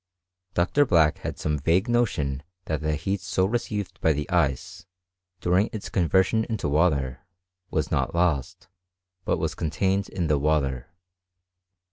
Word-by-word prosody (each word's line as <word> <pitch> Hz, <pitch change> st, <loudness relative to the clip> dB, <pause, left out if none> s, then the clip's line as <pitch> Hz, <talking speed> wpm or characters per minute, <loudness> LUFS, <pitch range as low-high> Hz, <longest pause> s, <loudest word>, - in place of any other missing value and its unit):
Dr. 90 Hz, +12 st, +3 dB
Black 80 Hz, -, +3 dB
had -, -, -5 dB
some 75 Hz, -1 st, -1 dB
vague 85 Hz, -, +2 dB
notion 85 Hz, -, 0 dB, 0.2 s
that 80 Hz, -1 st, -2 dB
the 75 Hz, 0 st, 0 dB
heat 95 Hz, +6 st, -2 dB
so 95 Hz, 0 st, +1 dB
received 105 Hz, -3 st, -3 dB
by 80 Hz, -, +4 dB
the 75 Hz, 0 st, -3 dB
ice, 85 Hz, +2 st, -1 dB, 0.5 s
during 90 Hz, +4 st, +2 dB
its 110 Hz, -, -6 dB
conversion 95 Hz, +5 st, +2 dB
into 110 Hz, -9 st, -2 dB
water, 70 Hz, -4 st, +1 dB, 0.5 s
was -, -, -1 dB
not -, -, 0 dB
lost, 85 Hz, -7 st, 0 dB, 0.6 s
but -, -, +1 dB
was -, -, -2 dB
contained 95 Hz, +5 st, -1 dB
in 90 Hz, -3 st, -2 dB
the 75 Hz, -2 st, +2 dB
water. 70 Hz, -4 st, 0 dB
85 Hz, 140 wpm, -25 LUFS, 75-95 Hz, 0.6 s, by